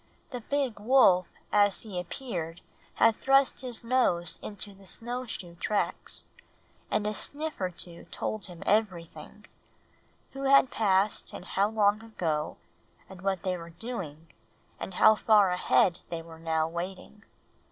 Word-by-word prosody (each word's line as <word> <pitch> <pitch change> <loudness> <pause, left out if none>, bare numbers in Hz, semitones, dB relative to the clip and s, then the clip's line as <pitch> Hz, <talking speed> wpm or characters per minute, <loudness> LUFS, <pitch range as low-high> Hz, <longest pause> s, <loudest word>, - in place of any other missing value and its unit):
The 250 - -4
big 270 -3 -1
wolf 205 -6 +5 0.2
as 205 -1 +4
he 200 -5 -5
appeared 175 -3 -5 0.3
had 225 -1 +4
thrust 270 0 +3
his 245 -3 -3
nose 230 -9 +1
into 205 -1 -5
the 195 0 -17
snow 245 +5 -3
shoe 180 -6 -6
tracks, 210 +2 -2 0.7
and 210 - 0
a 210 - 0
sniff 300 +4 -3
or 185 - +1
two 170 -1 -6
told 215 -1 -4
him 175 -2 -10
everything, 195 -6 -1 0.9
who 275 0 -5
had 275 -1 +6
passed, 200 -1 +1
and - - -8
how 200 +2 +1
long 210 -1 +2
ago, 160 -9 -2 0.5
and 190 -2 -12
what 190 -2 -1
they 185 -2 0
were 170 -1 -8
doing, 165 -5 -6 0.5
and 190 - -6
how 215 - +7
far 210 -3 +4
ahead 180 0 +3
they 165 -1 -4
were 165 -1 -12
now 160 -1 0
waiting. 185 +5 -7
200 Hz, 145 wpm, -29 LUFS, 175-225 Hz, 0.9 s, how